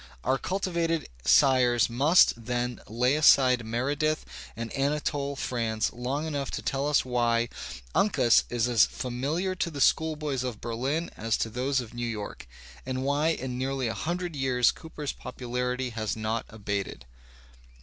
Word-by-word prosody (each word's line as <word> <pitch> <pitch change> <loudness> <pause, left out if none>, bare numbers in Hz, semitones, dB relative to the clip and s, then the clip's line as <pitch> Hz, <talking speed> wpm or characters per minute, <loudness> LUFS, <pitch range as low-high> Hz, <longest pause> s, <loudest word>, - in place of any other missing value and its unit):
Our 130 +1 +1
culti 190 0 -2
vated 165 -1 -1 0.2
sires 125 -4 +5
must, 140 +9 +5
then, 120 0 -2
lay 125 +5 +1
aside 130 -5 +5
Meredith 140 +7 -1 0.3
and 115 0 -5
Anatole 140 0 -1
France 115 -4 -1
long 130 +5 -3
enough 145 -4 -3
to - - -7
tell 140 0 -1
us 150 - +3
why 120 -2 +1 0.4
Uncas 130 - +4
is 120 -1 0
as 115 -6 +5
familiar 145 +10 -2
to 175 - -2
the 145 -3 -7
school 160 +3 +3
boys 145 -4 -2
of 125 -4 -4
Berlin 130 +8 -2
as 115 0 0
to 115 - -2
those 130 +3 0
of 120 -1 -10
New 120 0 -3
York, 105 - -6 0.4
and 130 0 -3
why 145 +3 +1
in 130 -6 -2
nearly 135 -1 -1
a 115 - -2
hundred 175 0 -3
years 130 -3 +3
Cooper's 150 -3 -6
popularity 125 0 -3
has 110 -3 -2
not 110 +1 -2
abated. 100 - -4
130 Hz, 155 wpm, -28 LUFS, 120-145 Hz, 0.4 s, sires